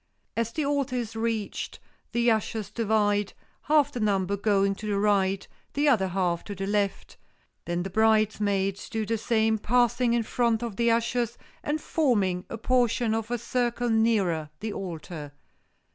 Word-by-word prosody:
As 230 Hz, 0 st, -1 dB
the 300 Hz, +3 st, -2 dB
altar 280 Hz, -2 st, 0 dB
is 230 Hz, -3 st, -3 dB
reached 225 Hz, -2 st, -3 dB, 0.3 s
the 235 Hz, 0 st, +3 dB
ushers 220 Hz, -2 st, -1 dB
divide, 210 Hz, -2 st, +1 dB, 0.4 s
half 295 Hz, -2 st, +4 dB
the 245 Hz, -, -5 dB
number 200 Hz, -2 st, +1 dB
going 200 Hz, -1 st, +2 dB
to 215 Hz, +2 st, -7 dB
the 205 Hz, -1 st, 0 dB
right, 195 Hz, -2 st, +1 dB, 0.3 s
the 290 Hz, +1 st, +1 dB
other 220 Hz, -9 st, +4 dB
half 180 Hz, -2 st, 0 dB
to 205 Hz, -, -6 dB
the 195 Hz, +1 st, -3 dB
left, 200 Hz, 0 st, -1 dB, 0.5 s
then 175 Hz, 0 st, -1 dB
the 190 Hz, -, -4 dB
bridesmaids 210 Hz, -2 st, +1 dB
do 220 Hz, -1 st, -2 dB
the 225 Hz, +1 st, -1 dB
same, 220 Hz, -1 st, +2 dB
passing 240 Hz, +1 st, +2 dB
in 235 Hz, -1 st, +2 dB
front 235 Hz, 0 st, +1 dB
of 230 Hz, -4 st, -4 dB
the 235 Hz, 0 st, +3 dB
ushers 235 Hz, 0 st, 0 dB, 0.3 s
and 300 Hz, +1 st, -1 dB
forming 205 Hz, -, +1 dB
a 230 Hz, -, -5 dB
portion 240 Hz, -1 st, +1 dB
of 225 Hz, 0 st, -2 dB
a 240 Hz, -, 0 dB
circle 240 Hz, 0 st, -1 dB
nearer 200 Hz, -9 st, +2 dB
the 215 Hz, -1 st, -4 dB
altar. 160 Hz, -5 st, -6 dB
220 Hz, 160 wpm, -27 LUFS, 200-235 Hz, 0.5 s, half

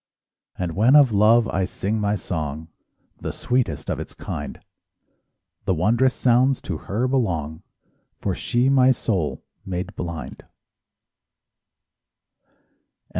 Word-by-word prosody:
And 90 Hz, -3 st, -3 dB
when 115 Hz, +8 st, +5 dB
of 140 Hz, -5 st, +7 dB
love 110 Hz, +3 st, +5 dB
I 95 Hz, -, 0 dB
sing 105 Hz, +3 st, -2 dB
my 105 Hz, 0 st, +1 dB
song, 80 Hz, -4 st, -4 dB, 0.5 s
—The -, -, -4 dB
sweetest 120 Hz, -, -1 dB
of -, -, -2 dB
its -, -, -8 dB
kind,— -, -, -6 dB, 1.1 s
The 95 Hz, -, +1 dB
wondrous 120 Hz, +10 st, +2 dB
sounds 130 Hz, +2 st, +3 dB
to 85 Hz, -, -3 dB
her 115 Hz, +6 st, 0 dB
belong— 85 Hz, -, -1 dB, 0.6 s
For -, -, -1 dB
she 120 Hz, +2 st, 0 dB
my 130 Hz, -1 st, +5 dB
soul 95 Hz, -11 st, -2 dB, 0.2 s
made 90 Hz, -1 st, -5 dB
blind. 85 Hz, -3 st, -6 dB
105 Hz, 115 wpm, -23 LUFS, 85-125 Hz, 1.1 s, of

